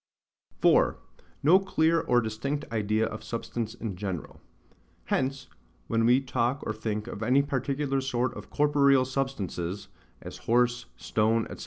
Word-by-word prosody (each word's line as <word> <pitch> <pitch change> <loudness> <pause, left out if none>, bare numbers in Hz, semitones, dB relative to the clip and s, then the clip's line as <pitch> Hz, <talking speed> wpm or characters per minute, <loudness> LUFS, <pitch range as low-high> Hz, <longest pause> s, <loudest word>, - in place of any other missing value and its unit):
4. - - +4 0.5
No 170 +7 +7
clear 165 -4 +2
or 120 0 +2
distinct 135 +7 -3
idea 110 0 +1
of 110 -1 -6
Substance 115 0 -4
in 110 -5 -5
general. 95 -4 -5 0.6
Hence, 135 0 -1 0.4
when 115 0 +1
we 125 +2 +5
talk 130 0 -1
or - - -1
think 105 -1 -3
of 115 -3 -7
any 130 +5 +3
particular 135 0 -1
sort 125 -1 -1
of - - -9
corporeal 140 -3 +4
substances, 100 -8 -3 0.3
as - - -9
horse, 120 +1 +2
stone, 110 +1 +1
&c. - - -16
120 Hz, 140 wpm, -28 LUFS, 110-135 Hz, 0.6 s, No